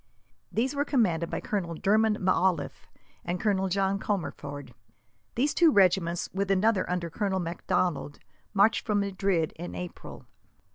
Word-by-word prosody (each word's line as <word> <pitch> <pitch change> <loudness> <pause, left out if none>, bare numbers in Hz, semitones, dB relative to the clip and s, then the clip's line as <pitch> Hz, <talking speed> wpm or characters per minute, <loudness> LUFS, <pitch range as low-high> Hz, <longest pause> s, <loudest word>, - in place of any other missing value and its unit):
These 255 +5 0
were 285 0 0
commanded 185 - +1
by - - -3
Colonel 175 -5 -3
Dermond 210 +4 +2
M'Auliffe 185 -3 0 0.3
and 175 +1 -3
Colonel 195 -2 +1
John 195 +1 +1
Comerford. 145 - -4 0.6
These 280 +5 +1
two 335 -3 +5
regiments, 180 -5 +3
with 195 +1 -1
another 195 +1 +2
under 175 -2 -2
Colonel 195 +1 -1
Macdonald, 170 -2 -1 0.3
marched 205 +3 +3
from 210 -2 +1
Madrid 195 -4 0
in 175 +2 -7
April. 180 -1 -8
190 Hz, 135 wpm, -28 LUFS, 175-210 Hz, 0.6 s, two